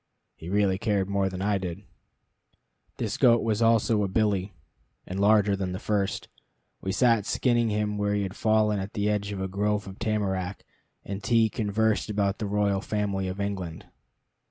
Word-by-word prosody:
He 80 Hz, -, -9 dB
really 100 Hz, -1 st, +2 dB
cared 100 Hz, -4 st, 0 dB
more 100 Hz, -1 st, 0 dB
than 95 Hz, 0 st, -5 dB
I 100 Hz, -1 st, +1 dB
did. 90 Hz, +1 st, -5 dB, 1.1 s
This 110 Hz, -1 st, -2 dB
goat 120 Hz, -3 st, +5 dB
was 110 Hz, -1 st, 0 dB
also 115 Hz, -1 st, +3 dB
a 100 Hz, -, +1 dB
billy, 100 Hz, -1 st, 0 dB, 0.5 s
and 95 Hz, +2 st, -5 dB
larger 105 Hz, -1 st, +4 dB
than 95 Hz, -2 st, -3 dB
the 90 Hz, -, -4 dB
first. 100 Hz, -2 st, -1 dB, 0.5 s
We 95 Hz, -, -2 dB
sat 115 Hz, -1 st, +3 dB
skinning 120 Hz, -2 st, +2 dB
him 105 Hz, 0 st, -1 dB
where 105 Hz, 0 st, +1 dB
he 100 Hz, -, 0 dB
had 95 Hz, 0 st, -5 dB
fallen 110 Hz, -2 st, +2 dB
at 95 Hz, +2 st, -5 dB
the 105 Hz, 0 st, 0 dB
edge 105 Hz, -1 st, -2 dB
of 100 Hz, -, -4 dB
a 95 Hz, -, -2 dB
grove 105 Hz, +2 st, -1 dB
of 95 Hz, 0 st, -10 dB
tamarack, 100 Hz, -4 st, -2 dB, 0.4 s
and 100 Hz, +1 st, -5 dB
T 115 Hz, +1 st, +3 dB
conversed 110 Hz, +1 st, 0 dB
about 100 Hz, -1 st, 0 dB
the 105 Hz, -, -2 dB
royal 100 Hz, -1 st, +1 dB
family 100 Hz, -3 st, -2 dB
of 95 Hz, +2 st, -5 dB
England. 95 Hz, -5 st, -4 dB
100 Hz, 180 wpm, -27 LUFS, 95-105 Hz, 1.1 s, goat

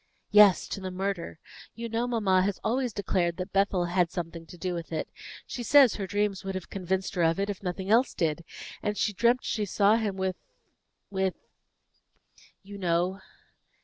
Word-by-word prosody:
"Yes, 210 Hz, -3 st, +7 dB
to 195 Hz, -, -4 dB
the 190 Hz, -, -4 dB
murder. 185 Hz, -3 st, -3 dB, 0.4 s
You 235 Hz, 0 st, -5 dB
know 230 Hz, +2 st, -1 dB
mamma 205 Hz, -6 st, +2 dB
has 195 Hz, +1 st, -1 dB
always 250 Hz, +1 st, 0 dB
declared 180 Hz, -4 st, -1 dB
that 185 Hz, +1 st, -5 dB
Bethel 195 Hz, -2 st, +2 dB
had 175 Hz, 0 st, +1 dB
something 165 Hz, -2 st, -6 dB
to 180 Hz, -, -12 dB
do 180 Hz, +1 st, -3 dB
with 170 Hz, -1 st, -6 dB
it; 160 Hz, -, -2 dB, 0.4 s
she 245 Hz, -, -6 dB
says 270 Hz, +1 st, +6 dB
her 195 Hz, -2 st, -4 dB
dreams 205 Hz, -1 st, -1 dB
would 195 Hz, 0 st, -4 dB
have 185 Hz, -, -6 dB
convinced 190 Hz, 0 st, -2 dB
her 180 Hz, -, -1 dB
of 165 Hz, +2 st, +2 dB
it, 200 Hz, +1 st, 0 dB
if 195 Hz, -, -8 dB
nothing 190 Hz, +1 st, -3 dB
else 240 Hz, +4 st, +4 dB
did; 165 Hz, 0 st, -1 dB, 0.4 s
and 210 Hz, 0 st, -2 dB
she 210 Hz, -, +1 dB
dreamt 235 Hz, +5 st, +2 dB
she 215 Hz, -, -1 dB
saw 205 Hz, +2 st, +3 dB
him 210 Hz, -4 st, -2 dB
with 190 Hz, -1 st, -1 dB, 0.7 s
with 190 Hz, -1 st, 0 dB, 1.3 s
you 200 Hz, +1 st, -10 dB
know." 180 Hz, +1 st, 0 dB
190 Hz, 180 wpm, -28 LUFS, 180-210 Hz, 1.3 s, Yes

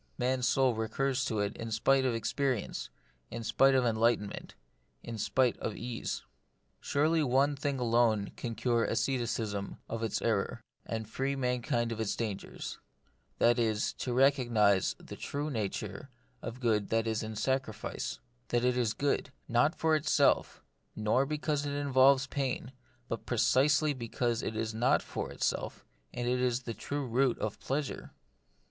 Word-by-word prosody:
Man's 125 Hz, 0 st, +1 dB
soul 130 Hz, 0 st, +3 dB
recurs 130 Hz, +4 st, -1 dB
to 110 Hz, -, -1 dB
it 100 Hz, 0 st, -2 dB
in 115 Hz, -, -5 dB
spite 130 Hz, +5 st, +3 dB
of 125 Hz, -3 st, +1 dB
experience, 125 Hz, 0 st, -1 dB, 0.4 s
in 115 Hz, 0 st, -5 dB
spite 135 Hz, +4 st, +4 dB
of 130 Hz, -1 st, +3 dB
enlightenment, 115 Hz, -2 st, 0 dB, 0.5 s
in 115 Hz, -2 st, -6 dB
spite 125 Hz, +2 st, +2 dB
of 110 Hz, -, -3 dB
ease. 120 Hz, -1 st, -4 dB, 0.6 s
Surely 155 Hz, +3 st, +2 dB
one 140 Hz, +1 st, +3 dB
thing 140 Hz, 0 st, -2 dB
alone 115 Hz, -4 st, +2 dB
can 115 Hz, -2 st, -4 dB
cure 120 Hz, -1 st, +1 dB
asceticism 115 Hz, -4 st, -1 dB
of 115 Hz, 0 st, -4 dB
its 115 Hz, -3 st, -1 dB
error, 110 Hz, 0 st, 0 dB, 0.3 s
and 110 Hz, -1 st, -3 dB
free 135 Hz, +5 st, -1 dB
mankind 125 Hz, -2 st, 0 dB
from 110 Hz, -1 st, -3 dB
its 110 Hz, -, -1 dB
dangers; 110 Hz, -4 st, -5 dB, 0.6 s
and -, -, +5 dB
that 120 Hz, +1 st, +4 dB
is, 110 Hz, -2 st, +1 dB
to 125 Hz, -, -4 dB
recognise 120 Hz, -7 st, +3 dB
the -, -, -10 dB
true 145 Hz, +2 st, -3 dB
nature 110 Hz, -6 st, -4 dB, 0.3 s
of 115 Hz, -, -5 dB
the 130 Hz, -, -15 dB
good 110 Hz, -4 st, +1 dB
that 115 Hz, 0 st, +1 dB
is 110 Hz, -1 st, -1 dB
in 110 Hz, -1 st, -5 dB
sacrifice; 130 Hz, -2 st, -2 dB, 0.3 s
that 120 Hz, 0 st, +1 dB
it 125 Hz, 0 st, +3 dB
is 120 Hz, -4 st, +1 dB
good, 140 Hz, 0 st, 0 dB, 0.2 s
not 120 Hz, +7 st, +3 dB
for 160 Hz, -1 st, +2 dB
itself, 155 Hz, 0 st, +2 dB, 0.3 s
nor 110 Hz, +6 st, +2 dB
because 150 Hz, -1 st, -1 dB
it 140 Hz, -, -2 dB
involves 135 Hz, -1 st, +4 dB
pain, 130 Hz, -2 st, -2 dB, 0.4 s
but 115 Hz, -, -5 dB
pre 120 Hz, -, -1 dB
cisely 140 Hz, +6 st, +4 dB
because 120 Hz, -1 st, -1 dB
it 110 Hz, -, -3 dB
is 110 Hz, 0 st, -2 dB
not 120 Hz, +4 st, +2 dB
for -, -, -5 dB
itself, -, -, -2 dB, 0.3 s
and 120 Hz, 0 st, -3 dB
is 125 Hz, 0 st, +1 dB
the 115 Hz, -, -4 dB
true 140 Hz, +6 st, -4 dB
root 125 Hz, +1 st, +2 dB
of 110 Hz, -1 st, -3 dB
pleasure. 140 Hz, +1 st, -3 dB
120 Hz, 160 wpm, -31 LUFS, 110-135 Hz, 0.6 s, and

